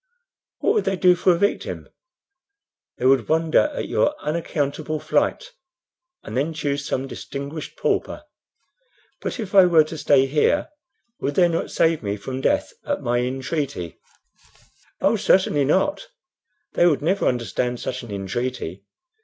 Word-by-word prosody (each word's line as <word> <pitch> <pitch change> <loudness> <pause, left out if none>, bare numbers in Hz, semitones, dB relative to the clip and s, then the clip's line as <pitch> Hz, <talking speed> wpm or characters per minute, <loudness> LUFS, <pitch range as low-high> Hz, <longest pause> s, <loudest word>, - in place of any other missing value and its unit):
"What 420 - +3
would 430 - +1
they 195 - +1
do 180 0 +5
for 180 +1 +3
a 170 - +2
victim?" 200 +3 -1 1.1
"They 125 - -3
would 135 +1 +3
wonder 160 - +3
at - - -4
your 295 - +1
unaccountable 155 -1 -2
flight, - - 0 0.7
and - - -7
then 150 +5 -1
choose 145 -2 -2
some 130 - -1
distinguished 140 - -7
pauper." - - -1 1.0
"But - - -4
if 210 -4 -5
I 190 -2 +8
were 165 -3 +6
to 155 +1 -8
stay 135 -3 +4
here, 150 - +1 0.5
would 145 - -2
they 180 -2 +5
not 165 -1 -2
save 165 -1 +2
me 100 -2 -3
from 130 +6 -5
death - - +1
at - - -3
my 120 0 +1
entreaty?" 130 - -3 1.0
"Oh, - - +3
certainly 150 -7 +3
not; 240 - +1 0.7
they 175 - +4
would 150 -4 +1
never 190 +5 +1
understand 125 +1 -1
such 130 0 -4
an 120 - -11
entreaty. 100 -1 -4
150 Hz, 145 wpm, -22 LUFS, 130-175 Hz, 1.1 s, I